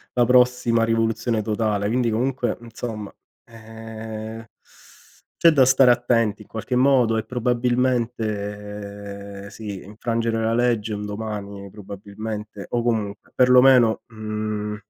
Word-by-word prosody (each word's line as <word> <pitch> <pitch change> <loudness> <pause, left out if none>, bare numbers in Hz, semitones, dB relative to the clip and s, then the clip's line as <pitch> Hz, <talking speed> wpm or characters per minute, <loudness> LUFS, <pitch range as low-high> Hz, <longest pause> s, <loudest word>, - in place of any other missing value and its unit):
la 120 - +4
prossima 125 -2 +3
rivoluzione 115 0 0
totale. 105 -1 -1
Quindi, 120 +1 +1
comunque, 125 +2 -1
mhmm, 120 - -13
insomma, 110 -3 -6 0.3
ehm, 110 0 -8 0.9
c'è 165 - +6
da 140 -4 +5
stare 130 0 +5
attenti 115 -3 +1
in - - -14
qualche 110 +3 -3
modo 125 -3 +4
e 110 - -1
probabilmente, 105 -5 -2
ehm, - - -9
sì, 100 -2 -7
infrangere 115 +2 -2
la 115 +1 +1
legge 115 -3 +1
un 105 0 -4
domani 105 -2 -6
probabilmente 105 +1 -7
o 120 -1 0
comunque, 110 -4 -2
perlomeno, 125 -2 +5
mhmm, 110 -1 -4
110 Hz, 120 wpm, -23 LUFS, 105-120 Hz, 0.9 s, c'è